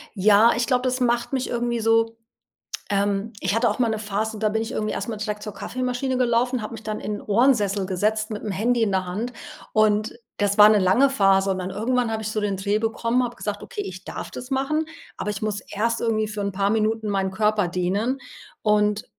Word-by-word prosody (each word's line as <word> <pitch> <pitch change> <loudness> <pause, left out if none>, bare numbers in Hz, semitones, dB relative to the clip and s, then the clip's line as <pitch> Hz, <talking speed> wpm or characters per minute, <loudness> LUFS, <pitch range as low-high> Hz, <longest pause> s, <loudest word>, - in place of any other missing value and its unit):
Ja, 210 +3 +5
ich 240 0 0
glaube 250 -1 +2
das 255 0 0
macht 240 +1 0
mich 260 -1 -1
irgendwie 240 0 -1
so, 225 0 +2 0.7
ähm 200 +2 0
ich 190 +1 0
hatte 230 +1 +3
auch 210 - -3
mal 240 -2 +2
'ne 220 - -1
Phase, 215 +1 -3
da 215 - +1
bin 220 +1 -1
ich 225 +2 -5
irgendwie 215 0 -2
erst - - -4
mal 225 - -3
direkt 210 0 -4
zur 210 -3 -6
Kaffeemaschine 255 +5 -2
gelaufen, 245 0 +1
habe 215 - -6
mich 225 -1 -8
dann 215 0 -4
in - - -4
'nen 205 - -5
Ohrensessel 210 -4 +2
gesetzt 215 +4 0
mit'm 210 0 -4
Handy 230 +5 +1
in 220 - +2
der 190 -1 0
Hand 220 +7 -3 0.4
und 215 0 +2 0.3
das 205 0 +1
war 210 0 +10
'ne 215 -1 +5
lange 235 +9 +4
Phase 195 -5 +3
und 190 - -1
dann 185 0 -4
irgendwann 235 +4 0
habe 220 0 -2
ich 220 - -3
so 215 - -1
den 205 -2 -1
Dreh 200 +2 0
bekommen, 230 +2 0
habe 240 -1 -4
gesagt: 205 -2 -4
„Okay, 205 - -5
ich 185 -1 -8
darf - - -6
das 250 +2 -8
machen, 275 +4 0 0.3
aber 210 - -3
ich 205 0 -5
muss 210 -2 -1
erst 230 +4 -2
irgendwie 220 -2 +1
für 210 -1 -5
'n 200 -1 -2
paar 200 +1 +1
Minuten 220 0 0
meinen 195 -1 0
Körper 210 -1 +1
dehnen.“ 195 +9 -1 0.4
Und 210 0 +2
215 Hz, 225 wpm, -23 LUFS, 205-235 Hz, 0.7 s, war